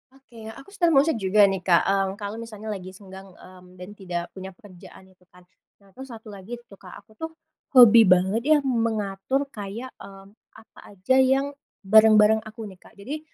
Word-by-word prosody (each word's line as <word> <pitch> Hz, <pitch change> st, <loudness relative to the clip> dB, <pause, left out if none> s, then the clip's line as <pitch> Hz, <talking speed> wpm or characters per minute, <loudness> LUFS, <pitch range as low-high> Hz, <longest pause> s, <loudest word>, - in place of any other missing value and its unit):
Oke, 235 Hz, -5 st, -15 dB
aku 275 Hz, -, -15 dB
sedang 345 Hz, -5 st, +1 dB
mau 275 Hz, -, +5 dB
share 315 Hz, -8 st, -2 dB
juga 205 Hz, +2 st, +3 dB
nih 190 Hz, -, -3 dB
Kak, 175 Hz, -2 st, +2 dB
mmm, 195 Hz, 0 st, 0 dB
kalau 205 Hz, +2 st, -7 dB
misalnya 220 Hz, -2 st, -8 dB
lagi 185 Hz, -2 st, -8 dB
senggang, 190 Hz, 0 st, -13 dB
mmm, 180 Hz, 0 st, -17 dB
dan 180 Hz, +2 st, -11 dB
tidak 180 Hz, -4 st, -6 dB
punya 190 Hz, -1 st, -11 dB
pekerjaan 190 Hz, -1 st, -16 dB
itu 180 Hz, -1 st, -29 dB
kan. 180 Hz, 0 st, -21 dB, 0.4 s
Nah 195 Hz, -, -23 dB
terus 265 Hz, +5 st, -12 dB
1 225 Hz, -3 st, -12 dB
lagi 200 Hz, +4 st, -9 dB
tuh 200 Hz, -4 st, -18 dB
Kak 185 Hz, -2 st, -13 dB
aku 220 Hz, -, -28 dB
tuh, 320 Hz, -, -5 dB, 0.5 s
hobi 230 Hz, -3 st, +7 dB
banget 185 Hz, +4 st, +2 dB
ya 310 Hz, 0 st, +5 dB
mengatur 230 Hz, 0 st, -2 dB
kayak, 220 Hz, +4 st, -8 dB
mmm, 195 Hz, 0 st, -14 dB, 0.2 s
apa 220 Hz, 0 st, -19 dB, 0.2 s
aja 200 Hz, +8 st, 0 dB
yang 270 Hz, +2 st, +1 dB, 0.3 s
barang-barang 215 Hz, +1 st, +5 dB
aku 220 Hz, +1 st, -11 dB
nih 185 Hz, -, -18 dB
Kak. -, -, -21 dB
Jadi, 270 Hz, +10 st, -7 dB
210 Hz, 190 wpm, -23 LUFS, 190-235 Hz, 0.5 s, hobi